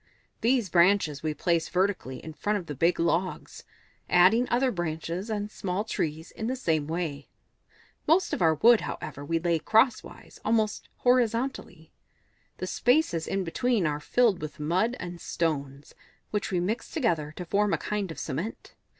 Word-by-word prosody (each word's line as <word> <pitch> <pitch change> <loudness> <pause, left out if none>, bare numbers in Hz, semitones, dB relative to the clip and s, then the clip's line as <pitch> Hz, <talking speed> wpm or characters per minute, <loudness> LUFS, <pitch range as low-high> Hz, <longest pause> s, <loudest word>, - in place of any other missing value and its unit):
These 235 -4 +2
branches 170 -5 +3
we 155 -1 -2
place 170 -1 0
vertically 185 -8 -1
in 160 - -7
front 210 +6 -1
of 185 - -6
the 150 - -5
big 165 +6 +1
logs, 170 +2 -1 0.4
adding 195 +8 +5
other 250 +2 +2
branches 175 +2 -4
and 210 -1 -3
small 190 0 -2
trees 160 -6 -3
in 220 - -5
the 255 - -1
same 160 - 0
way. 160 -4 -4 0.8
Most 345 +4 +3
of - - -2
our 160 -2 +4
wood, 230 +8 +6
however, 145 - -6
we 165 +3 0
lay 170 0 +1
crosswise, 225 - +1
and - - -30
almost 215 -1 0
horizontally. 245 +1 0 0.7
The - - -4
spaces 245 - +1
in 195 0 -1
between 220 +3 0
are 150 -1 0
filled 225 +3 +2
with 150 -1 -7
mud 185 +11 +1
and 175 -1 -7
stones, 140 -4 -3 0.4
which 210 -1 -1
we 180 - 0
mix 215 +6 -2
together 165 - 0
to 180 - -6
form 205 +3 +1
a - - +2
kind 210 -3 -3
of 160 - -7
cement. 165 +10 -5
180 Hz, 165 wpm, -27 LUFS, 160-220 Hz, 0.8 s, wood